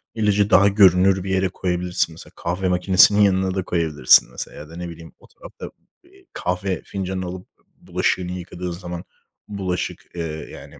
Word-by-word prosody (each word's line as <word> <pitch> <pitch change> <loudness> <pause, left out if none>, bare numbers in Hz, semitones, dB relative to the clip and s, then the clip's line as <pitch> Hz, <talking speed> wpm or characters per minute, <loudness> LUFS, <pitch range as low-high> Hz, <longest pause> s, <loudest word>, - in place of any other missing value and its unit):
ilacı 105 -2 +2
daha 100 +2 +6
görünür 95 -1 +4
bir 95 - -5
yere 95 0 +1
koyabilirsin. 90 -2 -2
Mesela 80 - -14
kahve 90 +2 -2
makinesinin 95 +3 +5
yanına 95 -1 +2
da 95 - -1
koyabilirsin 80 -9 +3
mesela - - -7
ya 75 - -10
da, 85 - -12
ne 90 -1 -5
bileyim, 85 0 -12
o - - -19
tarafta, - - -11 0.3
eee, 380 +1 -23
kahve 90 +1 -2
fincanını 95 -1 -4
alıp 90 +1 -7
b - - -35 0.3
bulaşığını 90 -1 -1
yıkadığın 90 0 -6
zaman 85 0 -7 0.4
bulaşık, 95 -3 -4
ııı, 80 -2 -5
yani - - -12
90 Hz, 165 wpm, -21 LUFS, 90-95 Hz, 0.4 s, daha